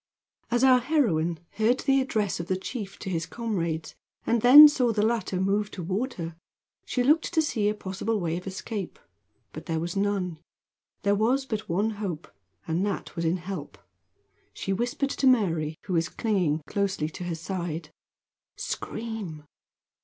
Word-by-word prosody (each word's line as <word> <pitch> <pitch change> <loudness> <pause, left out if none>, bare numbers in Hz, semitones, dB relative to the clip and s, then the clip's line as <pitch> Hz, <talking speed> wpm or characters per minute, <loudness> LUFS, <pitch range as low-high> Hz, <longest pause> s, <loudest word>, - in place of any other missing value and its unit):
As 240 +2 +1
our 260 -1 +7
heroine 200 - +1
heard 225 +4 +1
the 270 -1 +3
address 215 -9 -1
of 170 - -5
the 185 - 0
chief 200 0 -6
to - - -6
his 165 -2 -2
comrades, 170 -9 -3 0.3
and 230 -1 +2
then 285 +6 +11
saw 255 -5 +2
the 210 -1 +1
latter 220 -5 0
move 200 +2 +1
toward 200 +8 -3
her, 165 -2 -5 0.5
she 250 - 0
looked 305 +5 +3
to - - +4
see 225 -9 +1
a 210 - -1
possible 205 +2 -2
way 165 -3 -1
of 180 +2 -6
escape, 195 - -5 0.6
but - - -9
there 165 -2 -1
was 170 +3 -4
none. 195 -4 -1 0.6
There 200 0 +3
was 240 +6 +2
but 215 -4 -4
one 200 +6 +1
hope, 200 -7 -5 0.4
and 165 +3 0
that 200 -3 -3
was 170 -1 -2
in 165 +3 +2
help. 180 -4 -7 0.8
She 195 - -2
whispered 245 +6 -1
to 275 - +1
Mary, 165 -11 +2
who 185 - -3
was 165 0 +1
clinging 180 -10 0
closely 195 -2 -1
to 180 - -7
her 175 -2 -2
side: 170 -2 -4 0.7
"Scream!" 220 -9 -5
200 Hz, 165 wpm, -27 LUFS, 170-230 Hz, 0.8 s, then